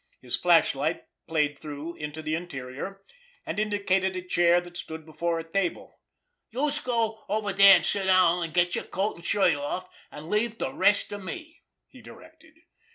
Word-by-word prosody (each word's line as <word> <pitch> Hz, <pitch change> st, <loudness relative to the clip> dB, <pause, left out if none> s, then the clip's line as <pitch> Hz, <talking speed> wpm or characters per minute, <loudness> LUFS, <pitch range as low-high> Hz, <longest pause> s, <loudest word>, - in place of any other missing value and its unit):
His -, -, -3 dB
flashlight -, -, +2 dB, 0.2 s
played 150 Hz, -3 st, 0 dB
through 150 Hz, +2 st, -7 dB
into 150 Hz, +1 st, -6 dB
the 155 Hz, 0 st, -2 dB
interior, 160 Hz, +3 st, -6 dB, 0.4 s
and -, -, -3 dB
indicated 195 Hz, -3 st, 0 dB
a 185 Hz, -, -4 dB
chair 175 Hz, -1 st, +3 dB
that 175 Hz, 0 st, -11 dB
stood 160 Hz, -2 st, -7 dB
before 165 Hz, +2 st, -2 dB
a 165 Hz, -, -4 dB
table. 175 Hz, +2 st, -3 dB, 0.5 s
"Youse 290 Hz, +5 st, 0 dB
go 230 Hz, -3 st, -1 dB
over 205 Hz, -1 st, -1 dB
dere 195 Hz, 0 st, +9 dB
an' -, -, +1 dB
sit 200 Hz, -2 st, +1 dB
down, 180 Hz, -2 st, +4 dB
an' 165 Hz, -, -3 dB
get 175 Hz, +1 st, +2 dB
yer -, -, 0 dB
coat 195 Hz, +1 st, -3 dB
an' -, -, -11 dB
shirt 185 Hz, 0 st, +3 dB
off, 145 Hz, +6 st, -4 dB, 0.2 s
an' 150 Hz, +1 st, -10 dB
leave 220 Hz, +2 st, 0 dB
de -, -, -3 dB
rest 200 Hz, +2 st, +3 dB
to 205 Hz, -, -6 dB
me," 320 Hz, -, -8 dB, 0.3 s
he -, -, -16 dB
directed. 320 Hz, 0 st, -16 dB
185 Hz, 175 wpm, -27 LUFS, 165-205 Hz, 0.5 s, dere